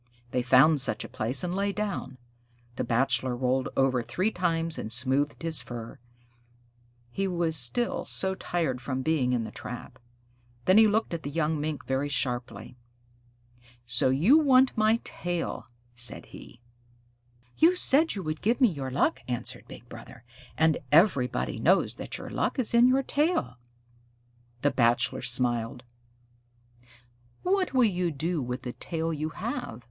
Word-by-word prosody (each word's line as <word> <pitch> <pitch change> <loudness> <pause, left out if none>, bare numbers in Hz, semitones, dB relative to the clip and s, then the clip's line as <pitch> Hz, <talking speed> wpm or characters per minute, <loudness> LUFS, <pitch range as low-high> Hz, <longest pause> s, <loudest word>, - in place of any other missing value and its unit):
They 125 - 0
found 135 +4 +5
such 110 -5 0
a - - -7
place 125 +4 -3
and 180 0 -2
lay 200 +1 0
down. 200 -10 -4 0.6
The - - -2
Bachelor 130 +1 +1
rolled 130 +1 0
over 130 -2 +2
three 185 - -1
times 165 -3 -1
and 110 - -5
smoothed 135 +6 +1
his 160 -5 +2
fur; 120 -2 -8 1.1
he 195 +8 -2
was 170 -3 -1
still 155 - +3
so 190 0 -1
tired 165 -9 -2
from 130 0 -3
being 145 -5 +1
in 120 -2 0
the 110 - -7
trap. 125 +2 -9 0.7
Then 190 +3 +6
he 220 - +7
looked 215 -2 0
at 165 - -3
the 145 - -5
young 155 0 -1
Mink 150 -3 -4
very 135 +2 -1
sharply. 120 -3 -2 1.1
"So 120 +2 +3
you 175 - +5
want 265 -3 +4
my 220 +1 +2
tail?" 175 -1 -4 0.3
said 120 0 -2
he. 120 - -14 1.0
"You 340 +3 +5
said 315 -3 +3
you 195 - -5
would 155 -1 -4
give 230 +5 +1
me 250 -4 +5
your 140 -6 -5
luck," 135 +2 0
answered 120 -1 -5
Big - - -12
Brother, 115 - -12 0.3
"and 160 0 +2
everybody 130 - +2
knows - - +2
that - - -6
your - - -9
luck - - -1
is 250 -4 0
in 235 +1 +6
your 265 +2 +2
tail." 285 - -1 1.0
The 145 - +3
Bachelor 120 +2 +1
smiled. 120 -1 -1 1.6
"What 370 -5 0
will 255 - +5
you 180 -5 +1
do 160 +2 -2
with 125 0 -5
the 125 - -5
tail 165 -1 -4
you 155 +1 -3
have?" 210 - -5
150 Hz, 155 wpm, -27 LUFS, 125-190 Hz, 1.6 s, he